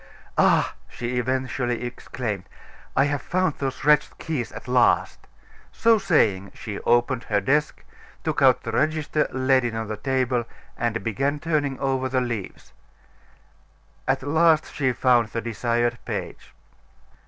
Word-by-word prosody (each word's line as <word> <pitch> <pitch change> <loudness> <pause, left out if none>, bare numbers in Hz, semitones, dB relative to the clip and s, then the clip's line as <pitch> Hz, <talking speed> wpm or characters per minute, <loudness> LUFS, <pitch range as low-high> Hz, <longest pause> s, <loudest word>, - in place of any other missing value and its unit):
"Ah!" - - +4 0.2
she 120 +1 -3
eventually 130 -1 -1
exclaimed, 120 -5 -5 0.5
"I - - +5
have 145 -1 -1
found 185 -3 -1
those 135 0 -3
wretched 150 0 +3
keys 150 -8 -3
at - - -10
last." 125 0 +2 0.4
So 230 -1 +3
saying, 105 - +2
she 105 -2 -6
opened 120 +1 +1
her 105 -1 +1
desk, 145 +9 0 0.4
took - - -1
out - - +5
the - - -4
register, 155 -1 +1
laid 130 0 +2
it 120 -2 -2
on 110 -1 -4
the 110 - -3
table, 125 0 0 0.3
and 115 -1 -2
began 135 +6 0
turning 145 -4 -1
over 130 -1 0
the 130 0 +1
leaves. 120 -6 -5 1.3
At - - +1
last 160 +2 +3
she 130 -3 +1
found 120 -2 +3
the 115 +2 -4
desired 120 +1 -1
page. - - -6
130 Hz, 140 wpm, -24 LUFS, 120-145 Hz, 1.3 s, I